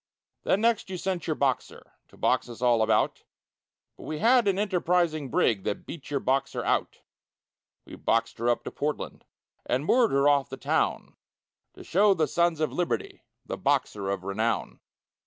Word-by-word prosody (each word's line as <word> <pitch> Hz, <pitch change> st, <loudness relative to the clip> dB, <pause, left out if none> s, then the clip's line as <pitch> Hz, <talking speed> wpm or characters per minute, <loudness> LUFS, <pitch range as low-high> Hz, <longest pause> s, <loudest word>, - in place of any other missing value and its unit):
Then 195 Hz, -, +1 dB
next 230 Hz, -3 st, +1 dB
you 185 Hz, -, -4 dB
sent 180 Hz, -2 st, -3 dB
your 155 Hz, -, 0 dB
Boxer, 135 Hz, -4 st, -2 dB
To -, -, -20 dB
box -, -, +1 dB
us 120 Hz, -, -9 dB
all 120 Hz, -2 st, +3 dB
about, 110 Hz, 0 st, +1 dB, 0.8 s
But -, -, -11 dB
we 155 Hz, -, -4 dB
had 235 Hz, +5 st, +4 dB
an 195 Hz, -1 st, +2 dB
Enterprising 175 Hz, -7 st, 0 dB
brig 105 Hz, -5 st, +1 dB
That -, -, -3 dB
beat 160 Hz, -5 st, -9 dB
your 145 Hz, -1 st, 0 dB
Boxer 135 Hz, +1 st, -1 dB
out; -, -, -1 dB, 0.8 s
We -, -, -13 dB
boxed 115 Hz, 0 st, 0 dB
her 120 Hz, +1 st, +1 dB
up 120 Hz, -, +1 dB
to -, -, -6 dB
Portland, 150 Hz, +1 st, -4 dB, 0.4 s
And 130 Hz, +4 st, -1 dB
moored 240 Hz, +5 st, +4 dB
her 140 Hz, +1 st, +3 dB
off 140 Hz, -2 st, +3 dB
the -, -, -7 dB
town, -, -, -1 dB, 0.6 s
To -, -, -11 dB
show 200 Hz, +2 st, +3 dB
the 160 Hz, -3 st, +1 dB
sons 170 Hz, -2 st, +1 dB
of 155 Hz, -, 0 dB
liberty 175 Hz, -1 st, -2 dB, 0.2 s
The -, -, -5 dB
Boxer 100 Hz, -2 st, 0 dB
of 100 Hz, -2 st, -2 dB
renown. 110 Hz, +4 st, -2 dB
150 Hz, 175 wpm, -27 LUFS, 120-180 Hz, 0.8 s, had